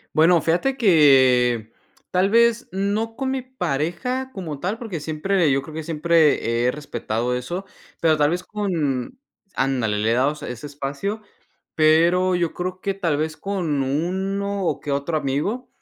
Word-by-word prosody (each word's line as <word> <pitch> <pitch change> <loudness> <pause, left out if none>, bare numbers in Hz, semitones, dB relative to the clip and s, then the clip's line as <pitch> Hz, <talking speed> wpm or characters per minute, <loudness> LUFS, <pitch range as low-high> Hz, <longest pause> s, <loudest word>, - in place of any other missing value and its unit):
Bueno, 165 +2 +5
fíjate 180 +12 +1
que, 130 - +4 0.4
tal 185 +2 +2
vez, 235 +1 +3
no 205 +4 -1
con 265 +1 -2
mí 265 - -2
pareja 255 - -2
como 160 -8 -6
tal, 190 +7 -2
porque 215 -9 -5
siempre, 160 +2 0
yo 135 0 +2
creo 155 - -11
que 160 0 -5
siempre, 150 -7 +2
he - - +3
respetado 120 -4 -3
eso, 175 +10 -4 0.4
pero 160 -2 +3
tal 145 0 +3
vez, 180 +1 -2
con 175 - -2 0.4
ándale, 125 -6 0
le 110 +2 +1
he - - +3
dado 135 +5 +2
su - - -9
ese 125 +4 -6
espacio, 145 +10 -4 0.5
pero, 170 +4 +4
yo 170 -2 -1
creo 185 +1 -4
que 195 -1 -2
tal 170 -7 0
vez, 155 +2 -2
con 165 -7 -2
uno 190 +7 -2
o - - 0
que 145 - -4
otro 140 +4 -1
amigo, 155 - -2
165 Hz, 165 wpm, -22 LUFS, 140-195 Hz, 0.5 s, Bueno